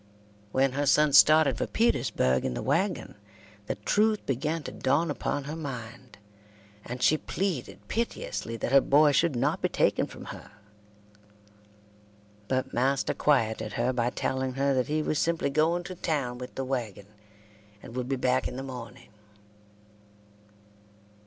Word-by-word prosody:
When 135 +2 +2
her 145 +2 -1
son 150 +1 +4
started 155 +1 +6
for - - -1
Petersburgh 65 - +1
in 60 - -2
the - - -4
wagon, - - 0 0.5
the - - -2
truth 210 - +1
began 150 +5 -2
to - - -6
dawn 150 +5 +1
upon 145 0 -2
her 150 +3 -6
mind, 125 -5 -8 0.7
and 125 +1 -5
she 155 - +4
pleaded 185 -9 -4
piteously 115 - -3
that 120 - -3
her 135 0 +7
boy 145 +2 +5
should 160 0 +2
not 120 - 0
be - - +1
taken - - +1
from - - -11
her; - - -13 1.9
but 130 0 -1
master 135 +3 +1
quieted 110 -6 +1
her 120 +2 0
by 120 -1 0
telling 130 +1 -2
her 135 +1 +1
that 130 -1 0
he 155 +1 0
was 150 - -1
simply 165 -4 0
going 165 +4 +1
to 185 - -7
town 140 -8 -2
with 125 - -8
the 135 - -3
wagon, 120 -7 -4 0.8
and 115 - -10
would 125 0 -3
be 135 - +1
back 130 0 +1
in - - -7
the 135 - -5
morning. 125 -4 -9
135 Hz, 150 wpm, -28 LUFS, 125-155 Hz, 1.9 s, her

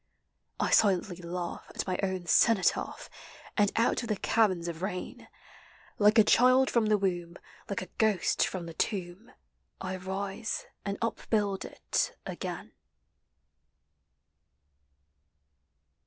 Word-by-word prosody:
I - - 0
silently 190 -3 +3
laugh 175 0 -5
at - - -4
my 185 - -2
own 190 -2 -2
cenotaph, 200 +2 +2 0.5
And 205 -2 +3
out 230 - +2
of 235 - -6
the 215 - +1
caverns 190 -5 +1
of 170 -1 -5
rain. 185 -1 -5 0.7
Like 210 +2 +5
a 220 - +9
child 255 +4 +5
from 230 -3 +2
the 210 0 +4
womb, 175 -3 -2 0.3
like 200 -2 -2
a 185 - -13
ghost 215 -5 +2
from 185 -3 -5
the 165 - -8
tomb, 185 +4 -3 0.5
I 185 0 -4
rise 195 +3 -4 0.2
and 200 0 -3
upbuild 210 -3 -1
it - - -2
again. - - -6
195 Hz, 120 wpm, -29 LUFS, 180-215 Hz, 0.7 s, a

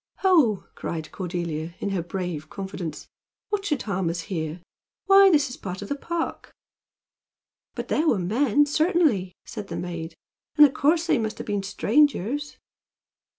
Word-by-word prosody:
"Ho!" 310 - +4
cried 160 -2 -5
Cordelia, 170 -3 -4
in 200 - -2
her 190 -3 0
brave 175 -3 -5
confidence, 190 -5 -6 0.4
"what 415 -1 -1
should 295 -9 -1
harm 190 -4 -1
us 170 +1 -2
here? 165 -3 -4 0.5
Why! 390 0 +8
this 295 -5 +4
is 250 - -8
a - - -27
part 190 +1 -5
of 200 - -9
the 285 - 0
park." 335 +3 -4 1.2
"But - - -5
there 320 - +1
were 235 - +4
men, 235 +9 +2
certainly," 295 - +2
said 215 -4 -7
the - - -5
maid; 170 -2 -5 0.4
"and 300 - +10
of 275 - +1
course 320 +4 +2
they 330 - +2
must 220 0 -3
have - - -6
been 205 -1 -1
strangers." 285 +6 +1
205 Hz, 160 wpm, -25 LUFS, 180-295 Hz, 1.2 s, and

